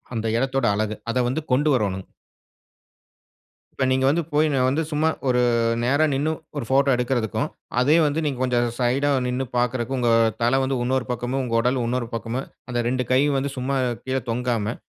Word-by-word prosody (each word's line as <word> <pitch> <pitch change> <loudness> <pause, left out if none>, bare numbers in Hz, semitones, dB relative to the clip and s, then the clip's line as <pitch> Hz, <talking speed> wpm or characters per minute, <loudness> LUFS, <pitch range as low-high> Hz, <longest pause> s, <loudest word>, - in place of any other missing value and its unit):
அந்த 115 0 -2
எடத்தோட 135 0 0
அழகு 110 +1 -1 0.2
அத 125 - 0
வந்து 130 +6 -1
கொண்டு 145 +4 +3
வரணுங்க 95 -5 -1 1.7
இப்ப 130 - -1
நீங்க 130 0 +1
வந்து 165 +5 +2
போய் 155 +1 +3
நான் 130 -2 +2
வந்து 150 +5 +1
சும்மா, 155 +1 +1 0.2
ஒரு 125 -1 +3 0.4
நேரா 140 +5 +3
நிண்ணு 145 +4 0 0.2
ஒரு 140 - -2
ஃபோட்ட 135 +1 +3
எடுக்கறதுக்கும். 120 -4 -1 0.3
அதே 145 +5 +4
வந்து 150 +2 0
நீங்க 140 -4 -2
கொஞ்சம் 120 -1 +1
சைடா 135 +4 +2 0.2
நிண்ணு 125 +1 -1
பார்க்கறக்கும் 125 +1 0
உங்க 120 -1 +2 0.3
தல 120 +3 +3
வந்து 135 0 -1
இன்னொரு 130 0 0
பக்கமும் 125 +2 -2
உங்க 115 -2 -3
உடல் 125 +2 +1
இன்னொரு 120 0 -1
பக்கமும் 115 +3 -3 0.2
அந்த 120 - -2
2 125 0 0
கை 130 - +5 0.2
வந்து 140 +1 -1
சும்மா 130 +2 -2 0.3
கீழே 130 0 -1
தொங்காம, 115 -2 -1
125 Hz, 175 wpm, -23 LUFS, 120-135 Hz, 1.7 s, கை